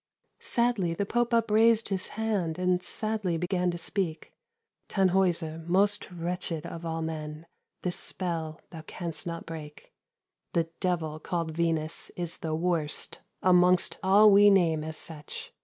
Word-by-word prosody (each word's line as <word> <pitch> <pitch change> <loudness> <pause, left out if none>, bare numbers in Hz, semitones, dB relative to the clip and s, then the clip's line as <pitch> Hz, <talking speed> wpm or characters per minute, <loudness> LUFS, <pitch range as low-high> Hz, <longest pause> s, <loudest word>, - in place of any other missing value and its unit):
Sadly 235 -8 +1
the 200 - -1
Pope 240 +3 0
upraised 225 -1 +4
his 190 -2 -2
hand, 205 -8 -1
And 180 0 +1
sadly 215 -4 -2
began 180 +1 0
to 175 - -2
speak: 170 -2 -3 0.6
"Tannhäuser, 180 -4 +1
most 200 +4 +2
wretched 175 -2 -3
of 165 - -7
all 165 -1 -2
men, 155 0 -5 0.4
This 180 -1 0
spell 165 -4 -3
thou 165 -3 -8
canst 170 -1 -5
not 170 0 -5
break. 155 -2 -9 0.6
"The 165 -1 +1
devil 160 -4 -1
called 165 0 -2
Venus 160 -1 -1
is 175 -2 -2
the 160 -1 -3
worst 165 -3 -1 0.2
Amongst 180 0 +4
all 205 +3 +6
we 205 +1 +8
name 165 -6 +3
as 160 0 -4
such. 150 -3 -7
175 Hz, 140 wpm, -28 LUFS, 160-195 Hz, 0.6 s, we